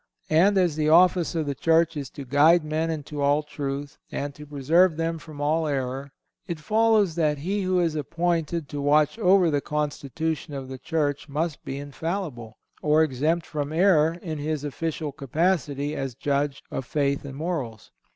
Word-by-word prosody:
And 190 +6 +5
as 175 -5 +2
the 155 0 +2
office 175 +1 +4
of 160 -2 0
the 140 - -1
Church 165 +3 +2
is 140 -3 -5
to 140 - -9
guide 155 +6 +5
men 155 +2 -1
into 150 -2 -4
all 145 +2 +3
truth, 145 0 -5
and 145 0 -3
to 150 +2 -12
preserve 155 +5 +3
them 165 0 -1
from 155 -2 -11
all 155 +2 +1
error, 135 0 -3 0.4
it 170 -2 -4
follows 215 +1 +3
that 155 -3 +1
he 190 +8 -2
who 185 -1 +1
is 170 -3 +1
appointed 165 +1 -1
to 145 - -4
watch 150 +7 +3
over 185 -4 +4
the 145 -1 +1
constitution 150 +1 -3
of 135 -1 -6
the 130 -1 -7
Church 145 -1 -1
must 155 +2 -2
be 135 - -5
infallible, 145 - -5 0.2
or 155 +1 +4
exempt 155 +4 0
from 145 -1 -4
error 165 -2 +4
in 155 -3 -4
his 150 0 -2
official 155 +1 -3
capacity 145 0 -1
as 135 -4 -4
judge 140 +1 -1
of - - -3
faith 140 +1 -1
and 140 -1 -8
morals. 145 -10 -4
150 Hz, 175 wpm, -25 LUFS, 140-165 Hz, 0.4 s, And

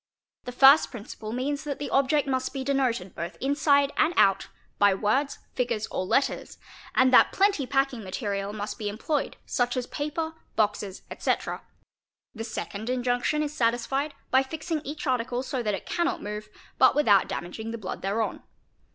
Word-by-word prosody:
The 250 - -4
first 270 +4 +7
principle 220 -2 -8
means 275 +4 -2
that 290 -2 -4
the 290 - -5
object 280 +2 +2
must 260 -1 -1
be 270 -1 -3
denoted 255 -9 0
both 170 +2 -6
inside 280 +1 +3
and 335 +2 +2
— - - -13
out 195 -1 +4 0.3
by 200 -1 +5
words, 240 +8 0 0.2
figures, 235 -4 -1
or 185 - -2
letters, 270 - 0 0.4
and 255 0 +4
that - - +7
plenty 385 -9 +2
packing 270 -4 0
material 200 0 -3
must 210 +2 -5
be 210 -2 -2
employed 270 +8 -2
such 245 0 0
as 250 - -1
paper, 320 +4 -3 0.2
boxes, 205 -3 -1
etc. - - -1 0.7
The 225 - -5
second 220 0 -5
injunction 250 +4 0
is 295 0 -4
satis 235 -2 +1
fied 280 +2 -2 0.2
by 260 - +6
fixing 310 +3 -3
each 300 +3 -6
article 250 -1 0
so 265 -1 -3
that 210 -3 0
it 190 - -8
cannot 345 0 0
move, 210 +1 -6 0.3
but - - +6
without 210 -10 +4
damaging 220 +6 -5
the 230 - -4
blood 195 -5 -6
thereon. 205 +4 -1
255 Hz, 170 wpm, -27 LUFS, 215-280 Hz, 0.7 s, first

